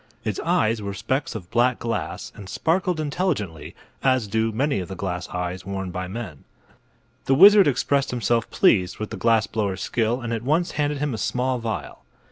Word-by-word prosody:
Its - - -2
eyes 110 0 +1
were 100 -1 -4
specks 130 +6 -2
of 90 -5 -8
black 120 +1 +3
glass 115 -1 -4
and 100 -2 -11
sparkled 175 0 0
intelligently, 140 - -2 0.3
as 130 -4 +2
do 110 +2 0
many 135 +1 0
of 90 - -5
the 95 - -7
glass 90 -2 -4
eyes 90 0 -4
worn 95 -1 -4
by 90 0 -4
men. 95 -8 -7 0.8
The 135 - +3
wizard 200 +3 +8
expressed 140 +1 +1
himself 120 -2 0
pleased 90 -3 +3
with 110 - -5
the - - -4
glass 115 -2 +3
blower's 100 -4 -2
skill 120 +1 0
and 120 -2 -4
at 115 - -2
once 155 +8 +1
handed 145 0 -1
him 145 -1 -1
a 110 - -4
small 125 +5 0
vial. 115 -1 -5
115 Hz, 185 wpm, -23 LUFS, 95-135 Hz, 0.8 s, wizard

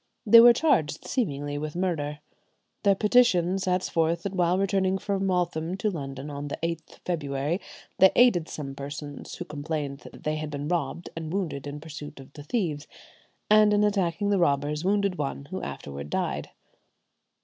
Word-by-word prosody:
They 230 +2 +9
were 240 +1 +10
charged 235 - +1
seemingly 145 - -2
with 155 +1 -5
murder. 150 -5 -2 0.6
Their 200 -1 +4
petition 195 -5 +3
sets 185 -1 0
forth 165 +1 0
that 200 - -3
while 180 -1 +2
returning 190 -1 +1
from 195 0 -1
Waltham 175 -1 -1
to 210 +2 0
London, 135 -4 -6
on 145 0 -5
the 140 - -4
8th 165 -1 -4
February, 150 0 -1 0.4
they 190 0 +8
aided 210 -10 +4
some 140 -3 -6
persons, 145 +1 -7
who - - -6
complained 150 -2 -4
that - - -13
they 155 0 -1
had 155 0 -4
been 145 0 -4
robbed 170 0 -2
and 160 -1 -5
wounded 165 -8 -3
in 145 +1 -6
pursuit 150 -1 -9
of 135 +1 -13
the 145 - -10
thieves, 155 -4 -2 0.6
and 215 0 +6
in 205 - +3
attacking 200 -1 +1
the 200 - +3
robbers 150 -1 +1
wounded 200 -2 +1
one 140 -1 -3
who 190 - -3
afterward 70 +1 -6
died. - - -2
165 Hz, 170 wpm, -27 LUFS, 145-190 Hz, 0.6 s, were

